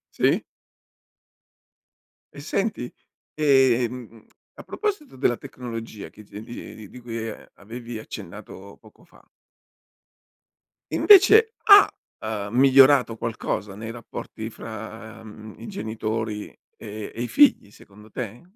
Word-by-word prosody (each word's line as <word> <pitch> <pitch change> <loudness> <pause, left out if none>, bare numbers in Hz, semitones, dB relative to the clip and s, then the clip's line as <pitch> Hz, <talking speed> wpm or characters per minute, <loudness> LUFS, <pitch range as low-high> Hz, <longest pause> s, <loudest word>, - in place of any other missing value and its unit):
Sì. - - +2 1.9
E - - -9
senti? 195 - -2 0.4
Ehm, 125 -5 +1 0.3
a - - -11
proposito 400 - -4
della 120 -2 +1
tecnologia 115 -4 -8
che 105 - -15
di 105 +1 -10
di 110 -2 -10
di 125 - -12
cui, 115 -2 -5
uhm, - - -10
avevi 115 +2 -8
accennato 100 -1 -10
poco 110 +6 -20
fa 170 - -22 1.7
invece 425 +3 +6
ha, 405 -2 +8 0.3
uhm, 105 -2 -4
migliorato 135 -2 +6
qualcosa 105 -4 -4
nei 110 +2 -7
rapporti 115 -1 -8
fra, 110 0 -9
mhmm, 110 0 -11
i 115 - -9
genitori, 110 0 -4 0.3
e 105 0 -8
e 115 - -5
i 120 - -2
figli 275 - +4
secondo 105 +1 -17
te? 120 -2 -6
115 Hz, 115 wpm, -24 LUFS, 110-130 Hz, 1.9 s, ha